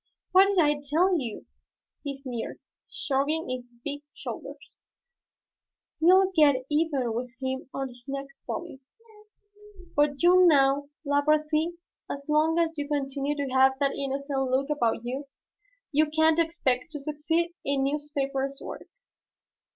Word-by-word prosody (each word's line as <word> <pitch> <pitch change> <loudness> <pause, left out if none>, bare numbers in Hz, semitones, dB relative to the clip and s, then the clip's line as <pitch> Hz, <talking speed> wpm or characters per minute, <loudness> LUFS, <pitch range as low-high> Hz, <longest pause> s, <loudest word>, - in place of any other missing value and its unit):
"What 380 +1 +7
did 400 -1 0
I 295 -3 +3
tell 340 +6 +2
you?" 235 -6 -6 0.6
he 280 -2 -5
sneered, 255 -4 -6 0.3
shrugging 295 +4 -1
his 250 -1 -5
big 290 0 -4
shoulders. - - -7 1.4
"We'll 375 +3 +5
get 285 -5 +4
even 295 -6 +1
with 245 +2 -3
him 260 0 -4
on 270 -1 -3
his 245 0 -16
next 275 0 -6
volume. 330 -5 -5 1.2
But 290 +1 +2
you 360 +1 +7
know, 280 -2 +4 0.2
Labarthe, 305 +3 +1 0.3
as 280 0 -5
long 310 +2 +3
as 330 -1 +1
you 285 - -3
continue 285 0 -1
to 280 -3 -3
have 265 0 +5
that 280 0 +1
innocent 275 -1 -2
look 275 +3 +1
about 235 -5 0
you, 265 +4 -4 0.6
you 305 +1 +3
can't 315 +1 +3
expect 315 -6 0
to 295 - -4
succeed 305 +4 -1
in 275 -1 0
newspaper 275 -1 -1
work." - - -8
285 Hz, 135 wpm, -27 LUFS, 270-310 Hz, 1.4 s, What